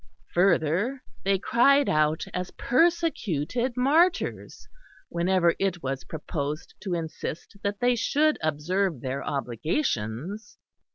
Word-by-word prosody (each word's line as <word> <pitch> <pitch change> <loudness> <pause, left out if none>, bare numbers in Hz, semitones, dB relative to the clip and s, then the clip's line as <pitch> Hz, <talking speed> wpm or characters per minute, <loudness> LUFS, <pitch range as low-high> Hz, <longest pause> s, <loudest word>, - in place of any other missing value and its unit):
Further, 185 - +2 0.2
they 195 0 +2
cried 275 +8 +4
out 155 +1 +2
as 180 0 -3
persecuted 250 - 0
martyrs 320 +8 +1 0.4
whenever 175 0 +2
it 185 -3 -1
was 135 -2 -3
proposed 150 +2 -4
to 190 -3 -3
insist 160 +2 -5
that 200 0 -2
they 245 0 +3
should 300 +6 +2
observe 155 +1 0
their 135 +1 -3
obligations. 140 - -2
180 Hz, 105 wpm, -26 LUFS, 155-245 Hz, 0.4 s, cried